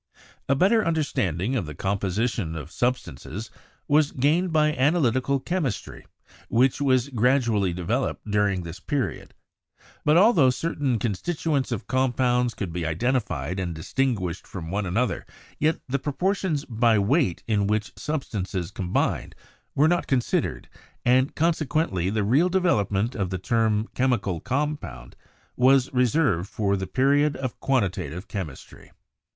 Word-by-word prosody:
A 135 - +4
better 205 - +4
understanding 130 - 0
of 100 -11 -1
the 75 - -7
composition 100 - -1
of 80 0 -7
substances 110 - -3 0.4
was 150 0 +3
gained 160 +7 +1
by 155 -1 +3
analytical 135 -2 +2
chemistry, 155 - -3 0.4
which 130 +4 +2
was 130 -1 +2
gradually 120 -6 +2
developing 105 +5 -2
during 100 -3 +1
this 85 +2 -8
period; 135 +6 -3 0.7
but 150 +2 +4
altho 180 - +6
certain 135 -2 -1
constitu 150 - -2
ents 130 -2 -1
of 105 -4 -3
compounds 125 -1 +1
could 95 -6 -4
be 90 0 -3
identified 90 - -1
and 85 -3 -3
distinguished 95 0 -2
from 85 -3 -7
one 100 0 -1
another, 115 +8 0 0.4
yet 155 +2 +2
the 135 +2 -1
proportions 160 +1 -1
by 115 -1 +2
weight 105 - +1
in 105 -3 +1
which 105 0 -1
substances 100 - -3
combined 90 -2 -1 0.4
were 150 +3 +4
not 175 +1 +1
considered, 130 -3 0 0.4
and 130 +3 +3
conse 165 0 +1
quently 95 - 0
the 110 -1 0
real 140 - +3
development 115 - +1
of 100 -7 -2
the 95 - -2
term 110 +2 +1
''chemical 115 -10 0
com 150 +3 0
pound" - - -10 0.4
was 130 +1 +4
reserved 125 - +2
for 100 -3 0
the 95 -1 -3
period 140 +3 +2
of 130 -3 -5
quantitative 95 - -1
chem 95 -2 -3
istry. 70 - -14
120 Hz, 140 wpm, -25 LUFS, 95-140 Hz, 0.7 s, altho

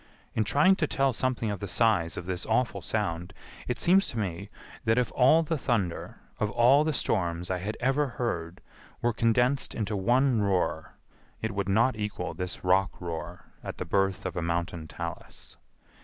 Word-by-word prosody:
In 110 - +1
trying 150 - +4
to 155 - +1
tell 135 -2 +1
something 120 -2 -1
of 100 - -4
the 100 - -5
size 90 -5 +2
of 90 - -5
this 90 -1 -3
awful 110 -3 0
sound 85 0 -2 0.3
it 125 - -1
seems 190 +3 +4
to 120 - -4
me 100 -1 -3 0.3
that 115 0 +2
if 125 -3 +1
all 145 +6 +5
the 160 -1 -2
thunder 110 -10 -2 0.2
of 105 - +1
all 125 +6 +5
the 155 - 0
storms 90 - -1
I 90 - -1
had 105 +5 -4
ever 135 +4 +1
heard 90 -8 -3 0.4
were 120 0 +2
condensed 120 +4 +1
into 105 -2 -2
one 120 +4 +2
roar 95 -5 -1 0.4
it 110 - -2
would 100 -1 -2
not 115 +6 +3
equal 105 -5 -4
this 90 +2 -5
rock 95 +1 +2
roar 85 0 -6 0.2
at - - -6
the - - -4
birth 95 -1 0
of 95 - -3
a 90 - -1
mountain 85 -1 -2
talus. 85 0 -8
105 Hz, 180 wpm, -28 LUFS, 90-125 Hz, 0.4 s, all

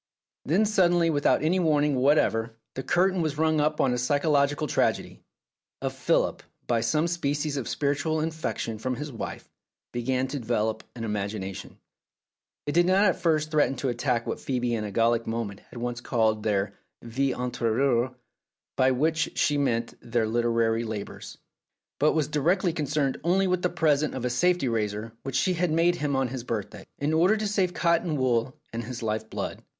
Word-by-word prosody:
Then 185 +9 +3
suddenly 175 -5 +3
without 145 0 +2
any 175 +4 +2
warning 150 -3 +2
whatever 125 -4 +2 0.2
the 130 - -4
curtain 185 +5 +2
was 155 -3 -1
rung 155 -1 +2
up 150 +1 0
on 130 - +3
a 125 - -1
psychological 145 +3 +2
tragedy; 145 - 0 0.6
for - - -2
Philip, - - 0 0.2
by 115 -2 +1
some 150 +8 +1
species 150 -3 -1
of 135 -5 -3
spiritual 145 +2 0
infection 155 -8 -3
from 130 +3 -2
his 150 +3 -6
wife, 115 - -6 0.5
began 130 +2 0
to 140 +1 -3
develop 110 -2 -1
an 115 - -6
imagination. 100 -2 -4 0.9
It 145 - -1
did 175 +3 +3
not 190 +3 +4
at 185 - +2
first 155 -2 +1
threaten 150 -3 +2
to 135 +1 -2
attack 120 -1 0
what - - -3
Phcebe 125 -2 -1
in 115 -2 -1
a 105 - -5
Gallic 115 +2 +2
moment 115 -3 -3
had - - -11
once 120 0 -3
called 110 -3 +1
their 100 -2 0 0.3
"vie 130 +3 -1
interipAire," 125 +1 0 0.6
by 130 0 +4
which 155 +5 0
she 145 - +2
meant 115 -4 0
their 115 -1 0
literary 115 0 +1
labours, 110 -3 -6 0.6
but 150 +3 +4
was 155 -3 +1
directly 170 +4 +1
con 155 -4 -2
cerned 140 -2 0
only 185 +3 +3
with 180 -1 +1
the 180 - +1
present 155 -4 +1
of 125 -1 -3
a 125 - 0
safety 180 +3 +2
razor 110 -1 -2
which 135 -1 -5
she 185 - +2
had 180 0 0
made 170 +2 +2
him 145 -3 -1
on 135 -2 +1
his 130 -1 -5
birthday, 115 -5 -5
in 145 +2 -1
order 180 +7 +4
to 215 0 -1
save 190 -3 0
cotton 170 -2 +1
wool 130 -1 +1 0.2
and 115 +1 -3
his 120 +1 -6
life 110 0 -2
blood. - - -4
135 Hz, 180 wpm, -27 LUFS, 115-160 Hz, 0.9 s, not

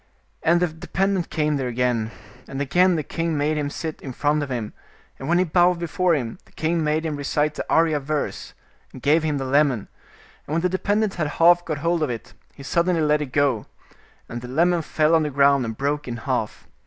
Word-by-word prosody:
And 170 +2 +3
the - - +5
dependent 180 +3 -1
came 150 -1 0
there 130 -2 -2
again, 120 -2 0 0.4
and 135 - -6
again 175 +6 +3
the 155 - -1
king 165 +1 -2
made 150 +2 +1
him 145 -1 -1
sit 160 +1 -6
in 130 - -7
front 150 +3 +1
of 145 - -4
him, 120 -4 -4 0.5
and 135 - -5
when 175 - +4
he 180 - +4
bowed 175 +1 +3
before 170 0 +1
him, 120 -6 -4
the - - -24
king 165 +1 0
made 155 +1 0
him 155 -2 -2
recite 150 +1 0
the - - -4
Arya 160 -2 +3
verse; 145 +1 -4 0.4
and 130 - -12
gave 150 +3 +4
him 155 -2 -1
the 135 - -3
lemon, 135 -5 +2 0.6
and 150 - -2
when 165 - +1
the 180 - +1
dependent 205 +3 0
had 155 -3 -1
half 175 +3 +4
got 155 -2 -2
hold 170 -1 +2
of 155 - +1
it, 115 -2 -6 0.2
he 140 - -11
suddenly 170 +3 +1
let 150 0 +2
it 150 - -2
go, 135 -6 +1 0.6
and 120 0 -6
the 125 - -8
lemon 170 +6 +2
fell 155 0 +1
on 165 - +5
the 150 - -1
ground 140 -1 +3
and 110 -1 -5
broke 145 +1 -1
in 120 -1 -4
half. 115 -3 -3
150 Hz, 220 wpm, -23 LUFS, 140-165 Hz, 0.6 s, the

